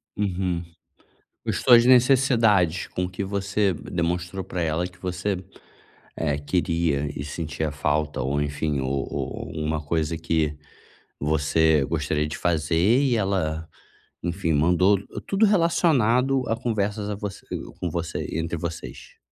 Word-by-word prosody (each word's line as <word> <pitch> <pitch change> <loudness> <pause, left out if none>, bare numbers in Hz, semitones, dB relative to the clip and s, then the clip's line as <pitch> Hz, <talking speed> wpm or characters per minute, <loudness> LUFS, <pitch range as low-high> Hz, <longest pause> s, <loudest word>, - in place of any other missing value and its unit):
Uhum, 90 -3 -1 0.8
com - - -4
as - - 0
suas 120 -2 +7
necessidades, 120 - +4
com 90 0 -3
que 95 +2 -4
você 100 0 0
demonstrou 85 +3 -3
pra 90 -1 -4
ela 80 +2 0
que 90 0 -19
você, 95 +1 -2 0.7
eh, 75 -3 0
queria 80 -1 0
e 70 - -4
sentia 80 0 -3
falta 75 +1 -1
ou 70 +3 0
enfim, 75 0 -1
ou 65 +1 -2
ou - - -4
ou 75 - -3
uma 75 0 -1
coisa 80 +1 -1
que 80 -2 0 0.6
você 80 0 +2
gostaria 75 +3 -1
de 75 - -5
fazer 80 -2 0 0.2
e 135 -4 +2
ela, 80 -6 -1 0.5
enfim, 85 -1 -1
mandou 90 +6 +4 0.3
tudo 200 +3 +3
relacionado 135 - +3
a 115 - +2
conversas 105 -3 -2
a 105 - -2
vo 105 0 -4 0.5
com 85 - -2
você 85 0 -3
entre 80 +1 -2
vocês. 85 0 -7
85 Hz, 135 wpm, -24 LUFS, 80-100 Hz, 0.8 s, suas